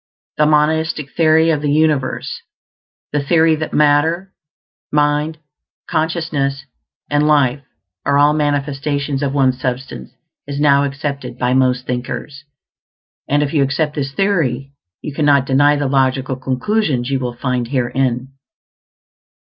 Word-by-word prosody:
The 150 Hz, -, +4 dB
monistic 155 Hz, -1 st, +1 dB
theory 160 Hz, 0 st, +4 dB
of 150 Hz, -2 st, 0 dB
the 150 Hz, -, -1 dB
universe 150 Hz, -3 st, 0 dB, 0.7 s
the 145 Hz, -, 0 dB
theory 160 Hz, +2 st, +3 dB
that 155 Hz, 0 st, -4 dB
matter, 160 Hz, +6 st, +2 dB, 0.6 s
mind, 150 Hz, +1 st, +1 dB, 0.5 s
consciousness, 155 Hz, -4 st, -1 dB, 0.5 s
and 145 Hz, +1 st, +2 dB
life 140 Hz, -3 st, +2 dB, 0.4 s
are 140 Hz, 0 st, +2 dB
all 145 Hz, +1 st, +5 dB
manifestations 145 Hz, -1 st, -1 dB
of 140 Hz, -2 st, 0 dB
one 135 Hz, -2 st, +4 dB
Substance 125 Hz, -, -5 dB, 0.3 s
is 140 Hz, 0 st, -4 dB
now 140 Hz, -1 st, +4 dB
accepted 140 Hz, -3 st, -5 dB
by 125 Hz, 0 st, 0 dB
most 130 Hz, -1 st, +2 dB
thinkers; 135 Hz, +4 st, -5 dB, 0.8 s
and 145 Hz, +1 st, +2 dB
if 145 Hz, -, -3 dB
you 150 Hz, -, +3 dB
accept 140 Hz, +3 st, 0 dB
this 135 Hz, -2 st, -3 dB
theory, 140 Hz, -7 st, 0 dB, 0.3 s
you 150 Hz, -, -5 dB
cannot 145 Hz, -2 st, +3 dB
deny 145 Hz, +2 st, +3 dB
the 145 Hz, 0 st, -1 dB
logical 130 Hz, -1 st, +1 dB
conclusions 130 Hz, -, -1 dB
you 135 Hz, -, +1 dB
will 125 Hz, -2 st, -4 dB
find 125 Hz, -1 st, -2 dB
herein. 130 Hz, 0 st, -1 dB
140 Hz, 130 wpm, -17 LUFS, 130-150 Hz, 0.8 s, all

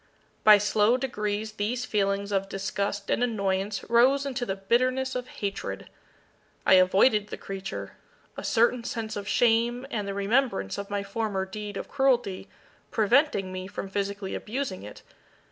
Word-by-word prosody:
By 215 Hz, -1 st, +9 dB
slow 210 Hz, +3 st, +3 dB
degrees 215 Hz, -4 st, -2 dB
these 220 Hz, +4 st, -2 dB
feelings 200 Hz, -1 st, 0 dB
of 195 Hz, -1 st, 0 dB
disgust 200 Hz, +1 st, -3 dB
and -, -, +1 dB
annoyance 200 Hz, -3 st, -1 dB
rose 260 Hz, +4 st, +4 dB
into 255 Hz, -3 st, -3 dB
the 195 Hz, -, -1 dB
bitterness 255 Hz, +6 st, +1 dB
of 250 Hz, 0 st, -4 dB
hatred. 200 Hz, -4 st, -5 dB, 0.7 s
I -, -, +6 dB
avoided 195 Hz, +4 st, +5 dB
the -, -, -6 dB
creature; 195 Hz, 0 st, -6 dB, 0.4 s
a -, -, -6 dB
certain 235 Hz, +1 st, +2 dB
sense 225 Hz, -2 st, -4 dB
of 200 Hz, -1 st, -5 dB
shame, 240 Hz, +3 st, +2 dB
and 210 Hz, -3 st, -2 dB
the 195 Hz, -, -3 dB
remembrance 200 Hz, -, 0 dB
of 200 Hz, -, -6 dB
my 200 Hz, 0 st, -2 dB
former 200 Hz, -1 st, -2 dB
deed 205 Hz, +1 st, -6 dB
of -, -, -5 dB
cruelty, 255 Hz, -8 st, +1 dB, 0.4 s
preventing 220 Hz, -3 st, +2 dB
me 185 Hz, 0 st, -5 dB
from 200 Hz, 0 st, -6 dB
physically 200 Hz, 0 st, -3 dB
abusing 235 Hz, -4 st, -4 dB
it. 105 Hz, -, -11 dB
210 Hz, 150 wpm, -27 LUFS, 195-240 Hz, 0.7 s, By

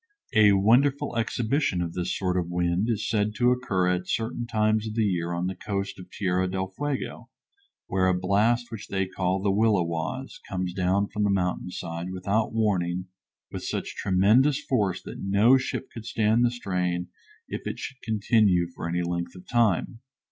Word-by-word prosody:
A 105 Hz, -3 st, +6 dB
wonderful 120 Hz, +7 st, +3 dB
exhibition 115 Hz, -, 0 dB
of 85 Hz, -1 st, -2 dB
this 90 Hz, 0 st, -2 dB
sort 90 Hz, -2 st, -1 dB
of 90 Hz, -2 st, -1 dB
wind 90 Hz, +4 st, 0 dB
is 110 Hz, -4 st, -1 dB
said 105 Hz, -1 st, 0 dB
to 125 Hz, +1 st, +3 dB
occur 100 Hz, -8 st, 0 dB
at 90 Hz, 0 st, 0 dB
certain 115 Hz, +1 st, -2 dB
times 110 Hz, -1 st, +1 dB
of 110 Hz, -, -5 dB
the 115 Hz, -2 st, +2 dB
year 85 Hz, -3 st, -1 dB
on 85 Hz, +1 st, -1 dB
the 95 Hz, -, -1 dB
coast 100 Hz, 0 st, -4 dB
at 90 Hz, -, -11 dB
Tierra 95 Hz, -1 st, 0 dB
del 95 Hz, 0 st, -3 dB
Fuego, 145 Hz, +1 st, -4 dB, 0.6 s
where 95 Hz, 0 st, +1 dB
a 90 Hz, -1 st, +2 dB
blast 110 Hz, +6 st, +2 dB
which 110 Hz, -3 st, -7 dB
they 95 Hz, -1 st, -1 dB
call 95 Hz, 0 st, -1 dB
the 100 Hz, -, +2 dB
"Williwaus," 100 Hz, +3 st, 0 dB
comes 90 Hz, -2 st, -2 dB
down 95 Hz, +2 st, +1 dB
from 105 Hz, -, -2 dB
the 100 Hz, -, +2 dB
mountain 90 Hz, -2 st, 0 dB
side, 85 Hz, 0 st, -5 dB
without 100 Hz, +4 st, 0 dB
warning, 90 Hz, -5 st, 0 dB, 0.4 s
with -, -, -6 dB
such -, -, -3 dB
tremendous 110 Hz, +10 st, +3 dB
force 100 Hz, -8 st, 0 dB
that -, -, -8 dB
no 100 Hz, +6 st, +5 dB
ship 130 Hz, 0 st, -2 dB
could 115 Hz, -1 st, -8 dB
stand 110 Hz, +2 st, +2 dB
the 120 Hz, -, +4 dB
strain 90 Hz, -6 st, -2 dB, 0.4 s
if -, -, -5 dB
it -, -, -3 dB
should 135 Hz, -, -7 dB
continue 105 Hz, -5 st, +2 dB
for 85 Hz, -, -5 dB
any 90 Hz, +1 st, 0 dB
length 85 Hz, 0 st, -3 dB
of 90 Hz, -, -12 dB
time. 115 Hz, -2 st, +1 dB
100 Hz, 180 wpm, -26 LUFS, 90-115 Hz, 0.6 s, A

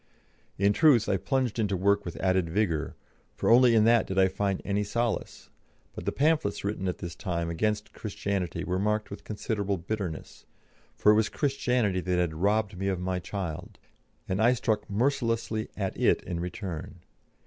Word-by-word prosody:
In 100 Hz, +1 st, +3 dB
truth, 135 Hz, -5 st, +5 dB
I 95 Hz, -, +2 dB
plunged 130 Hz, 0 st, -1 dB
into 100 Hz, -3 st, 0 dB
work 100 Hz, +2 st, +2 dB
with 85 Hz, -, -5 dB
added 95 Hz, -2 st, +1 dB
vigour, 85 Hz, -4 st, -1 dB, 0.4 s
for -, -, +1 dB
only 120 Hz, 0 st, +6 dB
in 110 Hz, -, +5 dB
that 115 Hz, 0 st, +4 dB
did 95 Hz, -, -4 dB
I 95 Hz, 0 st, +5 dB
find 100 Hz, 0 st, -1 dB
any 100 Hz, +1 st, 0 dB
solace, 115 Hz, +2 st, -3 dB, 0.4 s
but -, -, -8 dB
the -, -, +1 dB
pamphlets 150 Hz, -8 st, +1 dB
written 100 Hz, -2 st, -2 dB
at 90 Hz, -, -2 dB
this 85 Hz, -3 st, -6 dB
time 85 Hz, -2 st, -3 dB
against 105 Hz, +5 st, -1 dB
Christianity 100 Hz, -5 st, -3 dB
were 90 Hz, +1 st, -1 dB
marked 105 Hz, +1 st, 0 dB
with 100 Hz, -, -8 dB
considerable 105 Hz, -2 st, -2 dB
bitterness, 90 Hz, -2 st, -5 dB, 0.5 s
for 105 Hz, -, +5 dB
it -, -, +5 dB
was 110 Hz, -1 st, +2 dB
Christianity 125 Hz, -8 st, 0 dB
that 90 Hz, 0 st, 0 dB
had 90 Hz, -3 st, +1 dB
robbed 100 Hz, +4 st, +1 dB
me 95 Hz, -, -1 dB
of 95 Hz, -2 st, 0 dB
my 90 Hz, 0 st, -2 dB
child, 90 Hz, -4 st, -5 dB, 0.5 s
and 95 Hz, +3 st, -1 dB
I 120 Hz, +3 st, +5 dB
struck 110 Hz, -4 st, -1 dB
mercilessly 115 Hz, -1 st, 0 dB
at 95 Hz, -2 st, -2 dB
it -, -, +2 dB
in 85 Hz, -2 st, -4 dB
return. 90 Hz, -2 st, -6 dB
100 Hz, 175 wpm, -28 LUFS, 95-110 Hz, 0.5 s, only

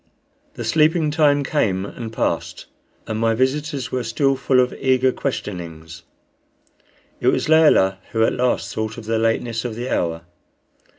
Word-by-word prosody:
The -, -, -5 dB
sleeping 155 Hz, 0 st, +2 dB
time 145 Hz, -2 st, +3 dB
came 100 Hz, -10 st, 0 dB
and 110 Hz, +2 st, -7 dB
passed, -, -, -2 dB, 0.4 s
and 110 Hz, -1 st, -3 dB
my 115 Hz, 0 st, +2 dB
visitors 135 Hz, +1 st, -1 dB
were 130 Hz, -1 st, -1 dB
still 135 Hz, +5 st, +1 dB
full 130 Hz, -1 st, +2 dB
of 125 Hz, 0 st, +2 dB
eager 130 Hz, 0 st, +2 dB
questionings. 85 Hz, -, -6 dB, 1.2 s
It -, -, -2 dB
was -, -, +2 dB
Layelah 150 Hz, -12 st, +4 dB
who 110 Hz, -1 st, +1 dB
at -, -, +2 dB
last 125 Hz, 0 st, -1 dB
thought 110 Hz, 0 st, -4 dB
of -, -, -9 dB
the 110 Hz, 0 st, 0 dB
lateness 115 Hz, 0 st, 0 dB
of 120 Hz, -3 st, -4 dB
the 120 Hz, +3 st, -5 dB
hour. 80 Hz, -1 st, -2 dB
120 Hz, 155 wpm, -21 LUFS, 110-135 Hz, 1.2 s, Layelah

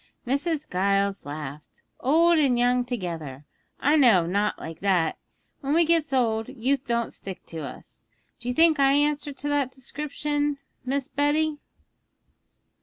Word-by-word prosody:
Mrs. 295 Hz, +4 st, -1 dB
Giles 195 Hz, +1 st, 0 dB
laughed. 145 Hz, 0 st, -8 dB, 0.2 s
'Old 330 Hz, +5 st, +4 dB
and 265 Hz, -5 st, +3 dB
young 245 Hz, +1 st, +3 dB
together! 165 Hz, -, -5 dB, 0.3 s
I 295 Hz, +3 st, +3 dB
know 230 Hz, -, +6 dB
of 170 Hz, -, -4 dB
nought 205 Hz, +2 st, +1 dB
like 160 Hz, 0 st, -8 dB
that; 185 Hz, -5 st, +1 dB, 0.4 s
when 280 Hz, +2 st, -1 dB
we 335 Hz, 0 st, +5 dB
gets 325 Hz, -2 st, +2 dB
old, 225 Hz, -4 st, +1 dB
youth 265 Hz, +3 st, -1 dB
don't 235 Hz, -1 st, -1 dB
stick 190 Hz, -2 st, -8 dB
to 165 Hz, -, -7 dB
us. 140 Hz, -5 st, -10 dB, 0.3 s
Do 240 Hz, -, -9 dB
you 250 Hz, -, 0 dB
think 320 Hz, -2 st, +5 dB
I 275 Hz, 0 st, +5 dB
answer 290 Hz, 0 st, +1 dB
to 285 Hz, +1 st, -5 dB
that 285 Hz, -3 st, 0 dB
description, 290 Hz, +2 st, -2 dB, 0.3 s
Miss 270 Hz, +1 st, -2 dB
Betty?' 295 Hz, +1 st, +1 dB
260 Hz, 150 wpm, -25 LUFS, 195-290 Hz, 0.4 s, know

